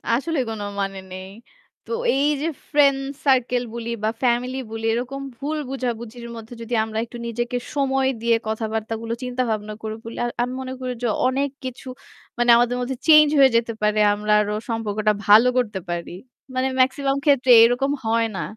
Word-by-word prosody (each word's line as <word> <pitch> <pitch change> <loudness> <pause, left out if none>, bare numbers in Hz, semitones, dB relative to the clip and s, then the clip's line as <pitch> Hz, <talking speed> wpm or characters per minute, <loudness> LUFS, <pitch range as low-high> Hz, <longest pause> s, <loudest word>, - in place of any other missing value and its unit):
আসলে 310 +3 -1
কোন 220 -2 -5 0.2
মানে 195 0 -3
নেই। 185 +1 -8 0.6
তো - - -10 0.2
এই 275 - +2 0.2
যে 320 - 0 0.2
ফ্রেন্ড 280 -2 +4 0.3
সার্কেল 250 -2 +2
বলি 235 0 -5
বা 215 - +2
ফ্যামিলি 250 +2 +1
বলি 225 0 -5
এরকম 255 +4 -3 0.2
ভুল 300 +4 -3
বোঝাবুঝির 235 -2 -5
মধ্যে 225 +1 -10
যদি 230 +1 -6
আমরা 220 0 -5
একটু 240 +1 -10
নিজেকে 240 +1 -2 0.2
সময় 270 -1 +1
দিয়ে 235 0 +3
কথাবার্তাগুলো 220 +1 -3
চিন্তা 250 0 -1
ভাবনা 215 -1 -3
করে 220 0 -4
বলি। 230 - -8 0.3
আমি 250 +1 -1
মনে 260 0 -5
করি 255 -1 -3
যে - - +2 0.2
অনেক 275 +2 0 0.2
কিছু 255 +1 -7 0.5
মানে 240 0 +1
আমাদের 245 +1 +2
মধ্যে 260 +1 -3
চেঞ্জ 305 -1 +8
হয়ে 270 -2 +7
যেতে 230 0 -1
পারে। 210 0 +2
আমরা 210 +1 0
আরো 210 0 -2 0.2
সম্পর্কটা 215 -2 0
ভালো 215 +4 +7
করতে 210 -6 0
পারি। 175 0 -4 0.4
মানে 255 +1 +1
মেক্সিমাম 275 +1 +2
ক্ষেত্রে 265 -4 +4
এরকম 250 +4 +2
হয় 225 0 +2
না। - - -2
240 Hz, 170 wpm, -22 LUFS, 220-265 Hz, 0.6 s, চেঞ্জ